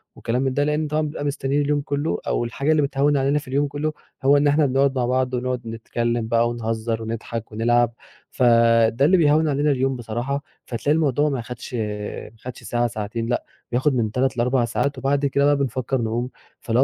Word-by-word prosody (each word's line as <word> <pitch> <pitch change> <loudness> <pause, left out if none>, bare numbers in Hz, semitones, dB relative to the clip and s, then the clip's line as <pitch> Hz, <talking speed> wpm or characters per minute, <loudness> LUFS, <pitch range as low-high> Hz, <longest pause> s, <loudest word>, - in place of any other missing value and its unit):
والكلام 125 +3 -1
ده، 140 +2 0
لأن 150 +1 0
طبعًا 150 +1 0
بنبقى 150 -1 -4
مستنين 145 0 0
اليوم 145 0 +1
كله، 145 +2 -2
أو - - 0
الحاجة 135 +6 -1
اللي 155 -1 +4
بتهوّن 140 0 +2
علينا 140 +2 +2
في 150 - -14
اليوم 140 +3 +1
كله، 150 +2 -3 0.3
هو 140 +2 +5
إن 145 +1 +3
إحنا 145 +1 +4
بنقعد 135 0 +2
مع 125 -2 +1
بعض، 130 +1 0
ونقعد 125 -1 -2
نتكلم 115 +1 -2
بقى 115 +1 +2
ونهزر 115 -1 -2
ونضحك 115 0 -5
ونلعب، 120 +2 +2 0.4
فده 115 0 +4
اللي 185 +5 +5
بيهوّن 155 -1 +4
علينا 145 +1 +2
اليوم 135 0 +1
بصراحة، 120 +4 -3 0.2
فتلاقي 125 +4 -1
الموضوع 150 -1 +2
ما 135 -4 -2
خدش 125 +1 -8
ما 105 -2 -4
خدش 125 +2 -9
ساعة 120 0 0
ساعتين، 110 +1 -4
لأ، 120 - -1 0.3
بياخد 130 +3 +2
من 110 -3 0
3 130 +2 0
ل4 125 +1 +2
ساعات، 140 +4 -1
وبعد 140 +2 +1
كده 140 +1 +3
بنفكر 130 -2 -1
نقوم، 115 +2 -2 0.3
فاللي 115 +1 0
هو - - +7
130 Hz, 195 wpm, -22 LUFS, 115-145 Hz, 0.4 s, هو